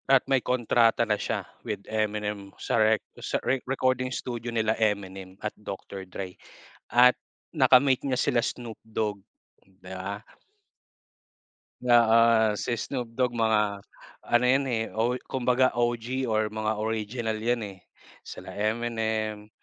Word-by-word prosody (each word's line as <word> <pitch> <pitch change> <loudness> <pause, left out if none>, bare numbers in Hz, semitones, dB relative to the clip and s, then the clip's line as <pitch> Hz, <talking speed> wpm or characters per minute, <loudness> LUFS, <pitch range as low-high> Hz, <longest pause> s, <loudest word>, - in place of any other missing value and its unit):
At 135 -1 +5
may 135 -1 +2
kontrata 120 -1 +2
na 110 - +1
siya - - -2 0.2
with 100 -2 -5
Eminem 105 -2 -2
sa - - 0
rec 110 0 +3 0.2
sa - - -1
re 135 -1 +1
recording 130 -1 +1
studio 120 -2 -4
nila 110 -2 +1
Eminem 95 -3 -2
at 105 - -2
Doctor 95 -2 -8
Drey. 95 0 -6 0.5
At 125 +1 +5 0.3
naka-meet 130 -2 +4
niya 130 -2 0
sila 120 - +2
Snoop 120 -2 -4
Dogg, 105 -2 -2 0.4
di 95 0 -29
ba? 95 +3 -6 1.6
Oo, 115 -2 +5
si 120 -1 -1
Snoop 125 +1 -4
Dogg 125 -2 +1
mga 105 -3 +1 0.5
ano 120 +1 +4
yan, 135 +2 +3
eh, 115 -2 0
o 120 +3 +1
kumbaga, 130 0 +2
OG 120 +2 -1
or 110 0 +2
mga 110 0 -1
original 110 +1 -2
yan, 120 -1 0
eh, 95 - -20 0.4
sila - - -9
Eminem. 110 -1 -2
115 Hz, 135 wpm, -27 LUFS, 105-125 Hz, 1.6 s, At